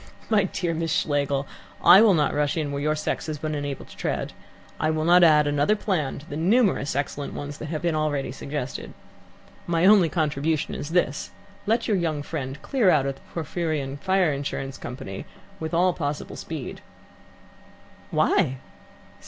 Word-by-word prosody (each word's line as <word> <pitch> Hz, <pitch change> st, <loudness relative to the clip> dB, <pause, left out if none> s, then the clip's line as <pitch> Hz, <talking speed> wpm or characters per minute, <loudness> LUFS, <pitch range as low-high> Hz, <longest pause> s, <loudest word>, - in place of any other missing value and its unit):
"My 205 Hz, -2 st, +4 dB
dear 175 Hz, -2 st, -2 dB
Miss 165 Hz, 0 st, -2 dB
Schlegel, 140 Hz, -2 st, 0 dB, 0.4 s
I 190 Hz, -, +9 dB
will 215 Hz, -4 st, +6 dB
not 150 Hz, -2 st, +2 dB
rush 145 Hz, +2 st, 0 dB
in 150 Hz, -3 st, -1 dB
where 140 Hz, 0 st, -3 dB
your 150 Hz, +1 st, +1 dB
sex 155 Hz, -, -3 dB
has 155 Hz, -1 st, -3 dB
been 155 Hz, +1 st, -3 dB
unable 145 Hz, -2 st, -4 dB
to -, -, -15 dB
tread. -, -, -3 dB, 0.5 s
I 155 Hz, -, +1 dB
will 155 Hz, 0 st, 0 dB
not 175 Hz, +1 st, +6 dB
add 150 Hz, -2 st, +6 dB
another 145 Hz, +8 st, +2 dB
plan 180 Hz, -10 st, -1 dB
to 145 Hz, -, -11 dB
the 145 Hz, -, -6 dB
numerous 185 Hz, -, +2 dB
excellent 145 Hz, 0 st, -3 dB
ones 145 Hz, +1 st, -6 dB
that 155 Hz, -, -5 dB
have 155 Hz, +1 st, -4 dB
been 170 Hz, -1 st, +1 dB
already 150 Hz, -4 st, -1 dB
suggested. 135 Hz, 0 st, -5 dB, 0.7 s
My 170 Hz, 0 st, +2 dB
only 195 Hz, -4 st, +6 dB
contribution 155 Hz, -1 st, 0 dB
is 145 Hz, -, -5 dB
this: 165 Hz, -4 st, 0 dB, 0.4 s
let 225 Hz, +2 st, +1 dB
your 210 Hz, -, +2 dB
young 155 Hz, -4 st, -1 dB
friend 140 Hz, -3 st, -5 dB
clear 245 Hz, -8 st, +2 dB
out 150 Hz, -6 st, +4 dB
of 140 Hz, -, -1 dB
the -, -, -21 dB
Porphyrion 155 Hz, -4 st, -2 dB
Fire 190 Hz, -4 st, +2 dB
Insurance 135 Hz, -1 st, -4 dB
Company 125 Hz, -6 st, -7 dB, 0.3 s
with 160 Hz, -1 st, -4 dB
all 180 Hz, +2 st, +3 dB
possible 145 Hz, -3 st, -4 dB
speed." 155 Hz, -6 st, -6 dB, 1.3 s
"Why?" 130 Hz, +1 st, +2 dB
155 Hz, 170 wpm, -25 LUFS, 145-170 Hz, 1.3 s, I